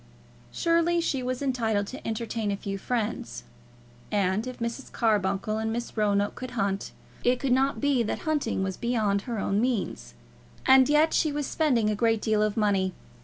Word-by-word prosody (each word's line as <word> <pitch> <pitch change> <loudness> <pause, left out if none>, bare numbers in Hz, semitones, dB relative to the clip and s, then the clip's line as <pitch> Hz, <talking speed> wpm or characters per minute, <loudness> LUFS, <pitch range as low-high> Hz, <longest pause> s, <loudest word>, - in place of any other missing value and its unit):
Surely 335 0 +2
she 275 -5 0
was 255 +2 -3
entitled 225 -6 0
to 265 +8 -8
entertain 225 -1 -2
a 200 - -1
few 195 0 -4
friends; 210 - -3 0.7
and 200 +3 +1
if 255 - -6
Mrs. 235 +3 -5
Carbuncle 210 -1 0
and 220 0 -1
Miss 235 +1 -4
Roanoke 205 -1 +1
could 255 -1 -7
hunt, 195 -1 -1 0.3
it 245 0 +2
could 275 - -1
not 270 +2 +2
be 285 -3 +2
that 220 - -2
hunting 290 -11 -1
was 190 -1 -3
beyond 215 -4 0
her 235 +1 -4
own 200 +1 0
means. 185 - -2 0.5
And 265 0 +6
yet 300 +2 +4
she 310 - +2
was 290 0 -2
spending 250 -9 +1
a - - 0
great 225 +1 +2
deal 215 0 +1
of 215 0 0
money. 195 -3 +1
225 Hz, 175 wpm, -27 LUFS, 205-255 Hz, 0.7 s, And